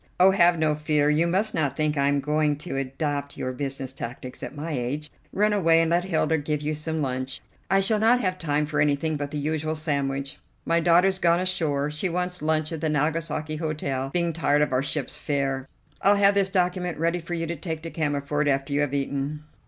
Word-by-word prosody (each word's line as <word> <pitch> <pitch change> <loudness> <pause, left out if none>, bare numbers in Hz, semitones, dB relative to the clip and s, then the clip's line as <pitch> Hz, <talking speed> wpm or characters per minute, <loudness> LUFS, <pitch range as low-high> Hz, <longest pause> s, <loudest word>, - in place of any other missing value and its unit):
"Oh, 190 +1 +7
have 175 -2 +4
no 155 -1 +2
fear; 150 -1 +1
you 160 +3 +2
must 195 +5 +1
not 150 -4 0
think 155 -1 +1
I 140 -1 +2
am 140 0 +2
going 150 0 +1
to 150 0 -6
adopt 140 +1 -3
your 130 - -2
business 135 0 -4
tactics 125 0 -7
at - - -6
my 155 +3 -5
age. 145 +3 -3 0.2
Run 210 +1 +2
away 165 -5 +4
and 165 0 +2
let 175 +1 +2
Hilda 160 -3 +1
give 150 0 -2
you 155 +1 -1
some 155 0 -2
lunch. 130 0 -2 0.3
I 195 0 +4
shall 210 +2 +2
not 230 +3 +4
have 185 -5 -1
time 150 -2 0
for 150 0 0
anything 150 +2 +1
but 145 -1 -3
the 150 - -4
usual 155 +1 -1
sandwich. 140 -3 -2 0.3
My 165 0 +2
daughter's 180 +3 +4
gone 170 -1 +3
ashore. 150 -6 0
She 150 +5 -2
wants 180 0 -2
lunch 155 0 0
at 160 -2 -5
the 160 - 0
Nagasaki 155 +1 -1
Hotel, 145 -4 -2
being 170 0 0
tired 150 -2 +2
of 150 - -1
our 130 - +2
ship's 140 -1 -2
fare. 135 -2 -1 0.3
I'll 200 +1 +5
have 200 0 +5
this 200 -1 +2
document 180 -2 0
ready 170 +3 0
for 175 +1 -5
you 165 0 -2
to 170 +1 -3
take 160 0 -5
to 165 - -5
Cammerford 145 -1 -1
after 135 0 0
you 145 - +2
have 145 -1 0
eaten." 140 +2 -2
155 Hz, 215 wpm, -25 LUFS, 145-170 Hz, 0.3 s, Oh